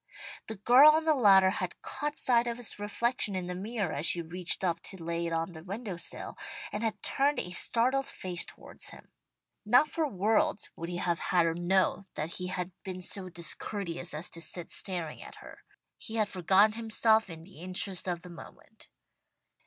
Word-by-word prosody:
The 220 - -5
girl 250 +9 +7
on 315 +1 +1
the 315 - +5
ladder 195 -8 +6
had - - -4
caught 295 0 -3
sight 240 -1 +3
of 235 0 -2
his 240 -4 -3
reflection 210 0 0
in 185 -1 -2
the 180 - -4
mirror 200 -1 -3
as 150 +4 0
she 170 0 +1
reached 180 +3 -2
up 170 -2 +1
to 190 -4 -7
lay 170 +1 -2
it - - -4
on 165 +2 -1
the 160 -2 -11
window 200 +1 -5
sill, 175 - -7 0.3
and 210 - -3
had 225 -2 -2
turned 285 +2 +2
a 180 - -1
startled 255 +8 +3
face 180 -2 -2
towards - - -10
him. - - -14 0.5
Not 250 +8 +5
for 320 -2 0
worlds 210 -1 +1
would 170 +1 -6
he 175 - -4
have 175 -1 0
had 175 -2 +2
her 165 - +1
know 190 +3 +1
that 155 +2 -3
he 180 - -3
had 180 0 -3
been 185 -2 -6
so 185 0 -1
discourteous 175 0 -4
as 155 +3 -2
to 165 - -8
sit 170 +1 -2
staring 175 -5 -1
at - - -10
her. - - -13 0.4
He 220 - -6
had 215 -2 +1
forgotten 190 +3 +4
himself 220 -1 +2
in 165 -1 -9
the 185 -2 -15
interest 185 +1 -1
of 175 -1 -2
the 180 - -10
moment. 170 - -14
190 Hz, 195 wpm, -30 LUFS, 175-225 Hz, 0.5 s, girl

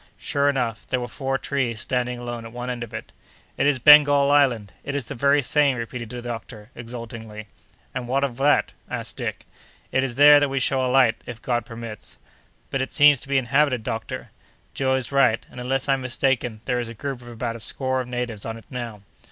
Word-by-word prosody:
Sure 140 0 +1
enough, 120 -5 -2
there 130 - 0
were 120 - -4
four 135 +1 -2
trees 130 -6 -2
standing 125 0 -1
alone 120 -1 -6
at 115 - -9
one 125 +1 -4
end 120 -1 -4
of 115 - -9
it. - - -7 0.4
"It - - +1
is 145 -2 +3
Bengal 145 +1 +7
Island! 120 -9 +2
It 140 - -4
is 135 -5 -3
the - - -5
very 140 +2 +3
same," 140 -1 +3
repeated 115 0 -5
the 120 0 -7
doctor, 115 -2 -7
exultingly. 115 -2 -8 0.5
"And 125 -1 -4
what 135 +3 +1
of 125 -4 -2
that?" 145 +2 +2 0.2
asked - - -5
Dick. - - -4 0.5
"It 130 - +2
is 125 -3 -3
there 145 +2 +8
that 145 -1 +1
we 135 0 -1
shall 130 0 +1
alight, 125 -2 +4
if 120 -2 -7
God 120 -1 -2
permits." 115 -3 -8 0.5
"But, 135 - 0
it 130 - -3
seems 145 -2 +6
to 140 - -10
be 140 - +2
inhabited, 135 -1 +2
doctor." 110 0 -5 0.4
"Joe 130 -1 +1
is 130 -1 -3
right; 130 -5 +3
and, - - -10
unless 130 +2 -1
I'm 135 -1 +2
mistaken, 125 -3 -1
there 125 -2 0
is 120 -1 -3
a 115 - -9
group 135 +1 -5
of 120 - -13
about 115 0 -4
a - - -8
score 130 +3 0
of 125 - -7
natives 120 -4 -4
on 115 0 -5
it 115 - -14
now." 120 -5 -6
125 Hz, 215 wpm, -23 LUFS, 115-135 Hz, 0.5 s, there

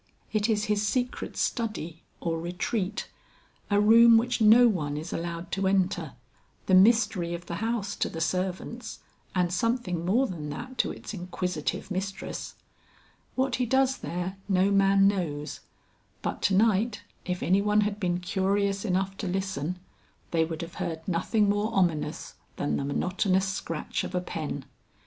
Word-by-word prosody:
It 215 +1 +1
is 215 -1 +2
his 210 -2 +1
secret 245 +4 -2
study 210 -9 -2 0.2
or 165 -1 -1
retreat, 185 +4 -2 0.6
a 205 0 +3
room 230 +2 +7
which 245 +1 0
no 225 +3 +8
one 150 -9 -1
is 160 +3 -5
allowed 170 0 -4
to 195 0 0
enter, 185 -5 +1 0.5
the 190 - +1
mystery 195 -3 +4
of 175 +1 -9
the 170 - -4
house 220 -1 -2
to - - 0
the 165 - -6
servants 185 +7 -3 0.3
and 180 -1 +1
something 200 -5 0
more 220 +10 +3
than 160 - -5
that 255 - -7
to - - +3
its - - -8
inquisitive 180 -2 -3
mistress. 195 +1 -4 0.8
What 260 -1 +1
he 250 -1 0
does 265 +2 +3
there 180 +3 -4
no 190 +1 +3
man 195 0 +5
knows, 155 -7 -2 0.6
but - - -3
to 195 - +2
night 210 +1 +2 0.2
if 180 0 -2
any 190 +2 +3
one 210 +1 +3
had 210 0 -1
been 175 -3 0
curious 195 +1 0
enough 195 -1 0
to 200 - -4
listen, 180 -3 -2 0.5
they 165 -1 +3
would 160 +1 -5
have 170 +1 -8
heard 160 -1 -4
nothing 205 +4 +1
more 205 +2 +1
ominous 165 -4 0 0.2
than 145 - -1
the 140 - -2
monotonous 185 +6 +1
scratch 165 -4 -3
of 185 - -5
a 180 - +1
pen. 155 -5 -5
190 Hz, 160 wpm, -28 LUFS, 175-210 Hz, 0.8 s, no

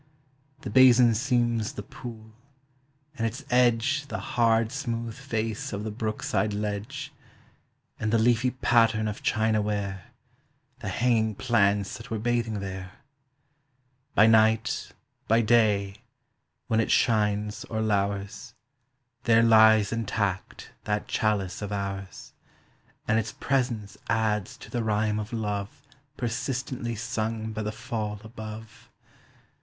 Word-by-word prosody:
The - - -6
basin 125 -2 +7
seems 120 -2 0
the 105 - -6
pool, 110 -2 -10 0.8
and 115 -2 0
its 110 - -7
edge 125 +4 +2
The - - -4
hard 115 -1 +1
smooth 115 -5 -3
face 115 -5 -3
of 100 +1 -3
the 110 - -4
brook 110 0 -4
side 110 -1 0
ledge, 105 +8 -4 0.9
And 110 -1 -1
the 115 - +4
leafy 120 +2 +3
pattern 115 -3 +2
of 105 - -5
china 110 -1 +1
ware 100 -3 -3 0.7
The - - -4
hanging 110 -3 +1
plants 100 -5 +1
that 115 - -11
were 115 - -2
bathing 115 -2 -1
there. 95 -1 -6 1.2
By 110 - +7
night, 110 0 +3 0.4
by 115 +1 +4
day, 105 -3 +2 0.7
when 110 - +1
it 115 - +1
shines 105 -2 +1
or 110 - -4
lours, 100 +2 -2 0.7
There 115 -1 +5
lies 110 -2 +6
intact 100 -4 -3
that 105 0 -1
chalice 105 -4 -1
of 105 0 -4
ours, 100 -1 -5 0.7
And 110 +1 +3
its 110 - -4
presence 120 -6 -1
adds 110 -3 0
to - - -13
the 120 -2 -1
rhyme 105 0 0
of 105 +1 -5
love 105 -3 -4 0.3
Persistently 120 0 -3
sung 110 0 -3
by 110 - -3
the 105 0 -2
fall 105 -2 -4
above. 110 +1 -10
110 Hz, 125 wpm, -27 LUFS, 105-115 Hz, 1.2 s, basin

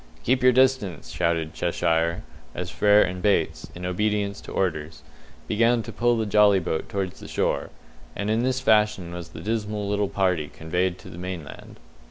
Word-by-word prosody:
"Keep 130 +2 +2
your 130 0 +6
distance!" 125 - +1
shouted 80 -1 -1
Cheshire, 85 +1 0 0.3
as - - -4
Frere 105 0 +5
and 90 0 -4
Bates, 95 -5 +1
in 90 +1 -6
obedience 100 +2 -1
to - - -10
orders, 80 -4 -2 0.4
began 115 +2 +2
to - - -7
pull 120 0 +1
the 110 - 0
jolly 105 -1 +5
boat 80 - -3
towards 95 -2 -3
the - - -10
shore; - - -1 0.5
and 100 - -3
in 110 +1 +2
this 130 +1 0
fashion 105 -6 +2
was 85 -1 -7
the - - -10
dismal 105 -1 -2
little 100 -1 0
party 90 -6 0
conveyed 90 +3 -1
to - - -12
the 85 - -9
mainland. 90 -4 -7
100 Hz, 175 wpm, -25 LUFS, 85-110 Hz, 0.5 s, your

